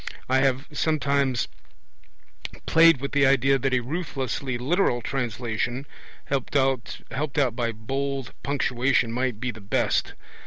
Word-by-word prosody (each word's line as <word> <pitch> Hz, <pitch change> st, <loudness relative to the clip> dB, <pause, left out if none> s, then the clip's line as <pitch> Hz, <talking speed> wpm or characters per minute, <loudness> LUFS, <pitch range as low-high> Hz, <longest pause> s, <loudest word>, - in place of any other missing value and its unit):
I 130 Hz, +1 st, +3 dB
have 135 Hz, +1 st, +1 dB
sometimes 140 Hz, -4 st, +1 dB, 1.2 s
played 165 Hz, -3 st, +6 dB
with 140 Hz, -, -3 dB
the 140 Hz, -1 st, +4 dB
idea 135 Hz, 0 st, +4 dB
that 135 Hz, +1 st, 0 dB
a 130 Hz, -1 st, +2 dB
ruthlessly 135 Hz, -3 st, -3 dB
literal 135 Hz, +1 st, +1 dB
translation, 120 Hz, 0 st, -2 dB, 0.4 s
helped 135 Hz, 0 st, -2 dB
out 135 Hz, 0 st, 0 dB
by 120 Hz, -2 st, 0 dB
bold 135 Hz, +4 st, -3 dB
punctuation, 130 Hz, -3 st, +1 dB
might 125 Hz, -2 st, -1 dB
be 125 Hz, +1 st, -2 dB
the 110 Hz, -1 st, -12 dB
best. 100 Hz, -, 0 dB
130 Hz, 120 wpm, -25 LUFS, 120-140 Hz, 1.2 s, played